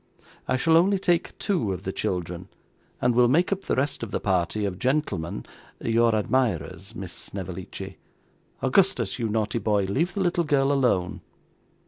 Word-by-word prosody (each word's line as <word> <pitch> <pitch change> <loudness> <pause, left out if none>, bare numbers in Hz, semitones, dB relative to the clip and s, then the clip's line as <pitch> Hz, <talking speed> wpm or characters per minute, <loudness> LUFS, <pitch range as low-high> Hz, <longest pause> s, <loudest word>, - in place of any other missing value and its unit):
'I - - +2
shall 160 +5 +4
only 195 +4 +4
take 175 -3 0
two 175 - 0
of 90 0 -6
the 95 - -3
children, 90 0 -3 0.5
and 125 - +2
will 120 +1 +5
make 165 +10 +3
up 195 0 -2
the - - 0
rest 140 +2 -1
of 115 - -4
the - - -2
party, 95 +2 0
of 95 -2 -3
gentlemen 105 - -1 0.3
your 115 0 +3
admirers, 105 - -1
Miss 95 -5 -6
Snevellicci. 95 -2 -6 0.6
Augustus, - - +2
you 115 -2 -1
naughty 110 +1 0
boy, 105 -3 +1
leave 155 - 0
the 200 - 0
little 175 -1 +2
girl 140 -3 +2
alone. 125 -10 +1
115 Hz, 160 wpm, -26 LUFS, 95-145 Hz, 0.6 s, will